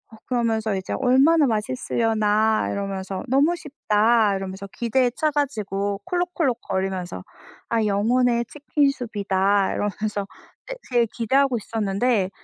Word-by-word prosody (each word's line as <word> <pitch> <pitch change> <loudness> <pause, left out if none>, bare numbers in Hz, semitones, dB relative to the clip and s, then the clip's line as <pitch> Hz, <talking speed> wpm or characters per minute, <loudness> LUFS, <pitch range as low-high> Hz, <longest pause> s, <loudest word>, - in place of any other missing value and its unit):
어 - - -16
그러면서 225 -4 0
이제 190 -1 -4
'얼마나 275 +5 +4
맛있으려나.' 220 -1 +1
이러면서 195 -1 -4
'너무 280 +7 +3
쉽다.' 225 - +2
이러면서 195 +1 -6
기대에 245 +2 +1
차 310 -1 +1
가지고 205 -8 -2
콜록콜록거리면서 195 - -2 0.5
'아 225 -2 +1
영혼의 235 +4 +2
치킨 290 +2 -1
soup이다.' 200 -6 0
이러면서 205 -1 -2 0.4
되 - - -5 0.2
되게 240 -1 +3
기대하고 265 +2 +2
있었는데 210 -1 0
220 Hz, 335 characters per minute, -23 LUFS, 200-255 Hz, 0.5 s, 얼마나